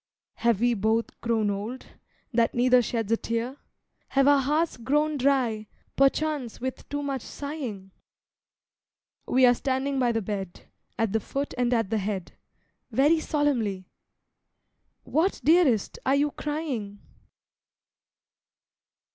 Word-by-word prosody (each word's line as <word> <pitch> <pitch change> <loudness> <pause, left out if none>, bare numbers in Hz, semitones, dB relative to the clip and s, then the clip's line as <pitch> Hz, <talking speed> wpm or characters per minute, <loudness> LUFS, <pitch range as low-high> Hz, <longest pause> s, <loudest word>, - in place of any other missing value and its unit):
Have 230 -3 +1
we 240 0 +3
both 220 +2 -1
grown 225 -3 +1
old, 215 +6 -5 0.5
that 230 -1 +2
neither 250 +1 +5
sheds 225 -2 -2
a 230 - +4
tear? 230 +5 -3 0.5
Have 275 0 +2
our 285 -1 +6
hearts 300 +5 0
grown 295 +5 +1
dry 250 -6 +1 0.3
perchance 275 -2 +1
with 260 +1 -5
too 290 0 -3
much 275 -3 -2
sighing? 250 -12 -6 1.4
We 255 0 +5
are 245 - +6
standing 265 +2 -1
by 245 -2 +3
the 225 -2 -1
bed, 195 -3 -5 0.4
At 225 -3 0
the 220 - +2
foot 275 +6 -4
and 245 -1 +1
at 225 -4 +1
the 220 - +1
head, 195 -3 -3 0.6
Very 300 +4 +3
solemnly!——What, 290 - -3
dearest, 305 - +3
are 270 - +3
you 290 +1 +2
crying? 275 -11 -4
250 Hz, 120 wpm, -26 LUFS, 220-280 Hz, 1.4 s, our